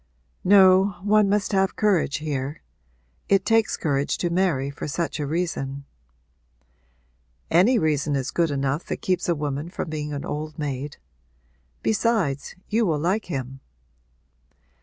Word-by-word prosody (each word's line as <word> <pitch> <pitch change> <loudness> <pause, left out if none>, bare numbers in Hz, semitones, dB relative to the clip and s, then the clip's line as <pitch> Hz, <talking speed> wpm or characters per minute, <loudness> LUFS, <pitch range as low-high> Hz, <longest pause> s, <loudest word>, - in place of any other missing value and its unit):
'No, 190 0 +6
one 210 0 +4
must 205 -1 +1
have 195 0 +2
courage 190 -9 +2
here. 145 - -4 0.7
It 195 -1 +3
takes 225 -1 +2
courage 140 -3 0
to 175 - -1
marry 170 -7 +1
for 140 - -6
such 160 +1 -3
a 145 - -2
reason.' 140 -4 -3 1.7
'Any 195 +10 +5
reason 150 -4 +1
is 135 -1 -2
good 170 -2 +1
enough 140 +2 -1
that - - -5
keeps 185 -1 0
a 170 - +3
woman 145 +1 -3
from 175 -2 -5
being 150 -1 -4
an 145 -1 -4
old 155 +1 -5
maid. 145 -2 -4 0.9
Besides, 205 - 0
you 225 +2 +1
will 165 -7 +1
like 185 +8 0
him.' 135 -5 -5
160 Hz, 140 wpm, -24 LUFS, 140-190 Hz, 1.7 s, No